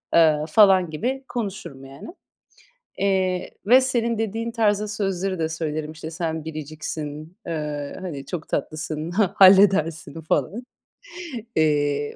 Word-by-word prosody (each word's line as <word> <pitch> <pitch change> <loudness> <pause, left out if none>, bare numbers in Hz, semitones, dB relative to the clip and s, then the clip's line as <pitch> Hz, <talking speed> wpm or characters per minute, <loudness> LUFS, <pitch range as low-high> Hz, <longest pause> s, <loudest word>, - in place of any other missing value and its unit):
eee, 160 -2 +6
falan 190 -3 +5
gibi 255 - -3
konuşurum, 190 - -5
yani. 135 +1 -11 0.9
Eee, 190 -2 0
ve 255 +4 +7
senin 235 -3 0
dediğin 225 +1 -2
tarzda 210 -2 +1
sözleri 195 -3 -2
de 160 0 0
söylerim. 155 -1 -3
İşte, 160 +1 -8
"Sen 160 -2 -3
biriciksin, 155 +1 -6
eee, 150 -3 -4
hani, 145 -7 -6
çok 165 0 -6
tatlısın, 155 +1 -3
ha 195 -1 +2
halledersin." 185 -4 +5
falan. 160 - -1 0.9
Eee, 145 -2 +1
165 Hz, 120 wpm, -23 LUFS, 155-200 Hz, 0.9 s, ve